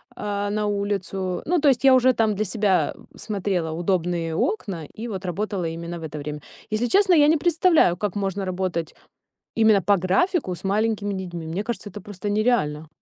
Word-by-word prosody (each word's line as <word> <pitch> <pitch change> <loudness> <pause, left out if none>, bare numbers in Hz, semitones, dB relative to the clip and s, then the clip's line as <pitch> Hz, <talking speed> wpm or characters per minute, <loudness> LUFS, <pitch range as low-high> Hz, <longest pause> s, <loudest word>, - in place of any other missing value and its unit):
э, 205 0 -2
на 210 +1 -1
улицу. 200 -2 -2
Ну, 350 +2 +2
то 300 - +2
есть 260 -2 +3
я 270 -1 +7
уже 255 0 +5
там 220 -3 +2
для 210 - 0
себя 200 -2 +1 0.2
смотрела 190 -6 -2
удобные 170 -1 -1
окна 190 - -2
и 225 +2 -7
вот 195 -4 -5
работала 195 0 -2
именно 170 +1 -5
в - - -10
это 155 -1 -6
время. 150 0 -6 0.3
Если 215 +3 0
честно, 385 +4 +4
я 295 -3 +6
не 320 +2 +4
представляю, 330 - +3
как 205 +1 -3
можно 195 -1 -2
работать 180 -3 -3 0.6
именно 220 -3 +5
по 200 +4 +4
графику 190 - +1
с - - -14
маленькими 205 +1 0
детьми. 175 -3 -5
Мне 175 +6 -3
кажется, 215 -2 -5
это 205 +1 -9
просто 205 0 -6
нереально. 205 -9 +1
200 Hz, 185 wpm, -23 LUFS, 175-220 Hz, 0.6 s, я